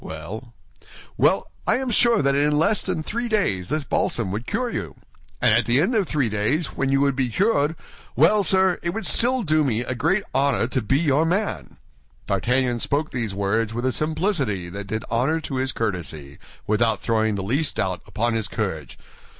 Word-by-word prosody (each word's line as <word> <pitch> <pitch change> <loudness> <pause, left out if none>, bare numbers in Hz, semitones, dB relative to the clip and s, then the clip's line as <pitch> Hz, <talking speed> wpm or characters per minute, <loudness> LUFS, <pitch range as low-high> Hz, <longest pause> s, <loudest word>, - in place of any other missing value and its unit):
"Well?" 105 +10 -8 0.6
"Well, - - +2 0.2
I - - +4
am 260 -1 -2
sure 235 -4 +4
that 140 0 +2
in 150 +1 +2
less 200 +7 +2
than 180 -4 -3
three 235 +7 -3
days 100 - 0
this 155 -1 -1
balsam 115 -5 -1
would 110 +4 -5
cure 245 +2 -1
you; 80 - -5 0.4
and - - +4
at - - +2
the 120 +3 +3
end 190 +11 +1
of 210 -6 +1
three 145 -5 0
days, 110 +10 -1
when 135 - -1
you 135 - +3
would 140 -1 +2
be 130 -2 0
cured—well, 160 - +1
sir, 190 -1 +3
it 170 +3 -3
would 225 - -4
still 245 +1 +3
do 155 -3 +2
me 120 -5 0
a 125 - -3
great 170 - +1
honor 135 -3 +2
to 130 - 0
be 135 +5 +1
your 150 -1 +2
man." 190 +6 -2 0.5
D'Artagnan 125 +5 0
spoke 145 +6 0
these 115 -6 -3
words 105 +3 -1
with 120 +1 -2
a 130 - +2
simplicity 150 - -1
that 100 +2 -7
did 110 +2 -4
honor 135 +8 +1
to 135 -3 -4
his 130 0 0
courtesy, 80 -9 -4 0.3
without 110 +2 +1
throwing 110 -2 +1
the 95 - -3
least 135 +10 0
doubt 90 -1 -2
upon 115 +3 -1
his 110 -2 -1
courage. 80 - -4
135 Hz, 190 wpm, -23 LUFS, 110-165 Hz, 0.6 s, I